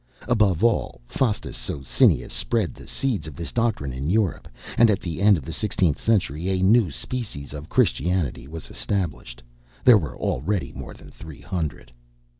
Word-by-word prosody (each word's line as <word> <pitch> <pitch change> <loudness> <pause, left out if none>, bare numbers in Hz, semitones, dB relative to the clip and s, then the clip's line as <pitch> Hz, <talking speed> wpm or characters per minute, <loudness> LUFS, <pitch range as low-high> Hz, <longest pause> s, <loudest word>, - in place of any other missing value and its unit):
Above 105 -8 +2
all, 115 -1 +1
Faustus 110 - -1
Socinus 65 +2 +1
spread 110 - 0
the - - -13
seeds 125 -12 -2
of 75 - -8
this 85 - -4
doctrine 110 - 0
in 70 +4 -3
Europe; 100 -2 +1 0.3
and 115 -1 +6
at 100 - +2
the 85 -1 -5
end 100 -1 +6
of 70 - -8
the 80 - -5
sixteenth 95 -7 0
century, 90 -6 +1
a 95 -1 +1
new 105 0 +5
species 75 - -5
of 75 +2 -8
Christianity 75 -2 +1
was 80 +2 -8
established. 70 - -3 0.4
There 120 -4 +8
were 80 - -6
already 90 +9 -1
more - - -8
than - - -14
three 80 -6 -11
hundred. 70 -3 -4
90 Hz, 165 wpm, -24 LUFS, 70-105 Hz, 0.4 s, There